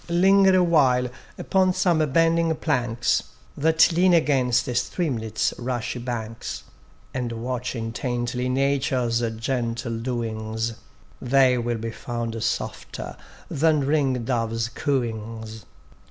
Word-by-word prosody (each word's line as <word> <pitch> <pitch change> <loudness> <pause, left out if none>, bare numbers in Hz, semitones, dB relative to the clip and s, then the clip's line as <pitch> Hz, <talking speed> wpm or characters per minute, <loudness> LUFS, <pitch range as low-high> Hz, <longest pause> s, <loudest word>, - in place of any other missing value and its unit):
Linger 190 +2 +5
awhile 140 -8 +3 0.3
upon 185 -1 +2
some 175 -4 +2
bending 165 +1 +3
planks 120 -7 0 0.3
That 160 +3 +4
lean 175 +2 +4
against 130 -6 +2
a 125 - -2
streamlet's 120 - -1
rushy 125 0 -3
banks, 115 -2 -5 0.5
And 125 -2 -2
watch 125 +2 -3
intently 120 +2 -2
Nature's 130 -3 +1 0.2
gentle 115 -1 -2
doings: 115 -2 -3 0.5
They 125 -1 +4
will 120 0 -1
be 115 +1 -4
found 115 -1 -4
softer 115 - -4 0.3
than 155 0 +2
ring 135 -4 +1
dove's 115 -2 -1
cooings. 110 -5 -3
125 Hz, 105 wpm, -24 LUFS, 115-145 Hz, 0.5 s, Linger